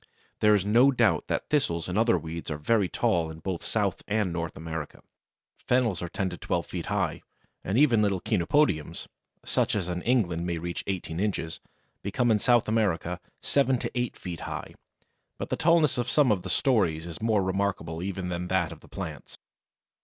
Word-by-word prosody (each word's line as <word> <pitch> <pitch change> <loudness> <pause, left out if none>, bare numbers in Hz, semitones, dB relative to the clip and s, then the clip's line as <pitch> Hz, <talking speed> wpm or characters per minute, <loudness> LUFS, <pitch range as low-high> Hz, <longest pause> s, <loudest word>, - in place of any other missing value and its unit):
There 105 0 +5
is 100 -2 0
no 120 +6 +6
doubt 130 - +2
that - - -2
thistles 85 - +1
and 90 - -3
other 115 +2 +4
weeds 80 +1 -6
are 75 - -2
very 95 +5 +2
tall 80 +1 +1
in 80 - -8
both 85 +2 -4
South 105 -4 0
and 105 -4 0
North 85 -1 -4
America. 80 -2 -6 0.6
Fennels 120 -8 +1
are 90 - -4
ten 95 - -1
to 85 - -6
twelve - - -1
feet - - -5
high, - - -1 0.4
and 100 +4 -1
even 125 -6 +5
little 100 -3 +2
Chenopodiums 110 - +1 0.4
(such - - +1
as 95 -4 -1
in 90 0 -2
England 90 -9 +1
may 85 -1 -1
reach 85 +1 -4
eighteen 90 -4 -3
inches), 95 -5 -2 0.4
become 120 +4 +1
in 105 - +3
South 120 +1 +3
America 90 -6 0 0.2
seven 135 -2 +2
to - - -4
eight 125 -1 -2
feet 90 -3 -6
high, - - -6 0.6
but - - -5
the - - +2
tallness 160 -6 +3
of 120 +1 -1
some 145 -6 +4
of 100 -4 +1
the 95 - -7
stories 90 - +2
is 85 +5 -7
more 110 -3 +2
remarkable 95 -4 -1
even 95 -1 -3
than 90 0 -3
that 90 -3 +1
of - - -9
the - - -18
plants! - - -7
95 Hz, 190 wpm, -27 LUFS, 85-115 Hz, 0.6 s, no